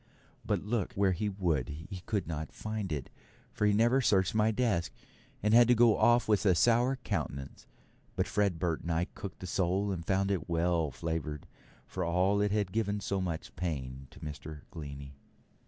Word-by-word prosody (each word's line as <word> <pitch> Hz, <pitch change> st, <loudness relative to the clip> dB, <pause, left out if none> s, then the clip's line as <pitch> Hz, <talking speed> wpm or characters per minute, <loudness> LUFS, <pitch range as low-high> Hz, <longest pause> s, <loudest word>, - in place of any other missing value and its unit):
But -, -, -1 dB
look 105 Hz, -1 st, -1 dB
where 100 Hz, -1 st, +2 dB
he 105 Hz, +4 st, -1 dB
would, 85 Hz, -10 st, 0 dB
he 80 Hz, +6 st, -7 dB
could 105 Hz, -6 st, 0 dB
not 80 Hz, -1 st, -4 dB
find 110 Hz, -4 st, -4 dB
it, 70 Hz, -4 st, -4 dB, 0.4 s
for 105 Hz, -, +1 dB
he -, -, +4 dB
never 120 Hz, +5 st, +4 dB
searched 95 Hz, -6 st, +3 dB
my 110 Hz, 0 st, +3 dB
desk, 110 Hz, -6 st, 0 dB, 0.5 s
and 105 Hz, +1 st, +3 dB
had 120 Hz, 0 st, +8 dB
to 125 Hz, -, +5 dB
go 115 Hz, -1 st, +5 dB
off 120 Hz, 0 st, +4 dB
with 105 Hz, -3 st, +3 dB
a 95 Hz, -4 st, +4 dB
sour 120 Hz, +7 st, +3 dB
countenance; 75 Hz, -8 st, -4 dB, 0.5 s
but -, -, +1 dB
Fred 100 Hz, -5 st, +1 dB
Burt 80 Hz, -1 st, -1 dB
and 85 Hz, -, -3 dB
I 85 Hz, +2 st, +1 dB
cooked 100 Hz, -, -8 dB
the -, -, -5 dB
sole, 95 Hz, +3 st, 0 dB
and 85 Hz, -3 st, -3 dB
found 95 Hz, +3 st, +1 dB
it 90 Hz, -5 st, -2 dB
well 85 Hz, -1 st, +1 dB
flavoured, 80 Hz, 0 st, -4 dB, 0.4 s
for 95 Hz, -, -4 dB
all 90 Hz, +4 st, +2 dB
it 105 Hz, -, +2 dB
had 100 Hz, -2 st, 0 dB
given 105 Hz, -1 st, 0 dB
so 100 Hz, -1 st, -2 dB
much 85 Hz, -3 st, -4 dB
pain 70 Hz, -6 st, -4 dB
to -, -, -15 dB
Mr. 75 Hz, 0 st, -7 dB
Glennie. 70 Hz, -4 st, -8 dB
95 Hz, 190 wpm, -31 LUFS, 80-105 Hz, 0.5 s, had